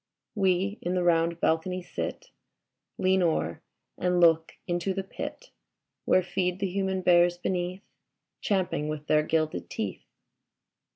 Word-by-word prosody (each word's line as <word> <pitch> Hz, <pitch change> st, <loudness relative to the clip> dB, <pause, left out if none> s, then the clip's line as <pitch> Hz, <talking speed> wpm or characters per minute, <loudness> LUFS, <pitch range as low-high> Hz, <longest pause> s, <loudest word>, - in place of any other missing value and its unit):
We 195 Hz, +1 st, +1 dB
in 180 Hz, +1 st, -1 dB
the 180 Hz, -, +1 dB
round 170 Hz, -1 st, +2 dB
balcony 180 Hz, +3 st, 0 dB
sit, -, -, -5 dB, 0.7 s
Lean 190 Hz, 0 st, +3 dB
o'er 155 Hz, -, 0 dB, 0.4 s
and 180 Hz, 0 st, +1 dB
look 165 Hz, -1 st, +4 dB
into 175 Hz, +2 st, -1 dB
the 195 Hz, -, -2 dB
pit 470 Hz, -, -7 dB, 0.5 s
Where 185 Hz, -, +4 dB
feed 180 Hz, 0 st, -1 dB
the 195 Hz, 0 st, -1 dB
human 190 Hz, -1 st, -1 dB
bears 175 Hz, 0 st, +5 dB
beneath. 180 Hz, +1 st, -2 dB, 0.6 s
Champing 185 Hz, -6 st, 0 dB
with 150 Hz, -1 st, -5 dB
their 155 Hz, 0 st, +4 dB
gilded 155 Hz, 0 st, -1 dB
teeth. 100 Hz, -4 st, -4 dB
180 Hz, 130 wpm, -28 LUFS, 165-190 Hz, 0.7 s, bears